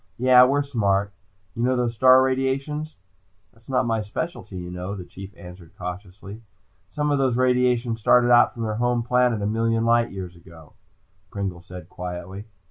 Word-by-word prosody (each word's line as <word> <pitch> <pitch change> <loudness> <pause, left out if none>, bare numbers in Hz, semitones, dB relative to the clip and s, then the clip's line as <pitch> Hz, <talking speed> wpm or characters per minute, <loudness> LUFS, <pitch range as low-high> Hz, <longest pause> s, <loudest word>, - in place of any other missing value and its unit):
Yeah, 125 0 +6
we're 140 +2 +1
smart. 100 -7 0 0.4
You 115 - -4
know 130 +1 +2
those 120 -2 -1
star 130 +2 +6
radiations?" 135 +4 -2 0.6
"That's 115 +2 -24
not 130 -1 +1
my 115 -2 0
specialty, 105 - -6
you 90 0 -7
know," 90 +3 -5
the 90 -3 -8
Chief 95 +2 -11
answered 90 -2 -13
cautiously. 95 +3 -8 0.5
"Some 150 0 -2
of 145 - +1
those 130 -3 +1
radiations 125 -2 +1
started 120 +3 +4
out 120 - +5
from 115 - -5
their 110 -1 -3
home 120 -1 +1
planet 125 -3 +1
a - - -1
million 115 +1 0
light 115 0 +3
years 90 -2 -8
ago," 85 -3 -16 0.6
Pringle 95 -3 -5
said 90 -1 -11
quietly. 90 +3 -7
115 Hz, 170 wpm, -23 LUFS, 95-125 Hz, 0.6 s, Yeah